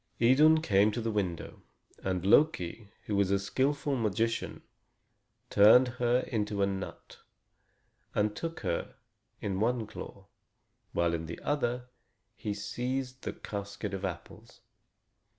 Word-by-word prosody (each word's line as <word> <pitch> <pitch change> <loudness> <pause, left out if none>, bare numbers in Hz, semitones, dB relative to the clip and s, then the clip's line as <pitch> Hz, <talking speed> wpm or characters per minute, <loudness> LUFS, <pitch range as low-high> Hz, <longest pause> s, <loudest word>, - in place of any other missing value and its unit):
Idun 150 +7 +5
came 100 -3 +4
to 120 - -2
the 115 -1 -1
window, 95 -6 -3 0.4
and 95 -1 -1
Loki, 105 - +3 0.2
who 105 - -1
was 100 -1 +2
a 100 - +3
skillful 140 +8 0
magician, 115 0 -1 0.9
turned 110 +5 +7
her 120 +1 +3
into 105 -5 -1
a - - +5
nut 95 -1 -6 1.0
and 105 0 +1
took 165 0 -5
her 85 - -2 0.5
in 95 -2 -2
one 115 +1 +1
claw, 100 -2 -9 0.7
while 85 -1 +1
in 80 -1 -3
the 85 - -6
other 125 -4 -1 0.5
he 105 - -4
seized 125 +5 -3
the - - -4
casket 100 0 -6
of 95 0 -4
apples. 95 -4 -7
105 Hz, 130 wpm, -30 LUFS, 100-125 Hz, 1.0 s, turned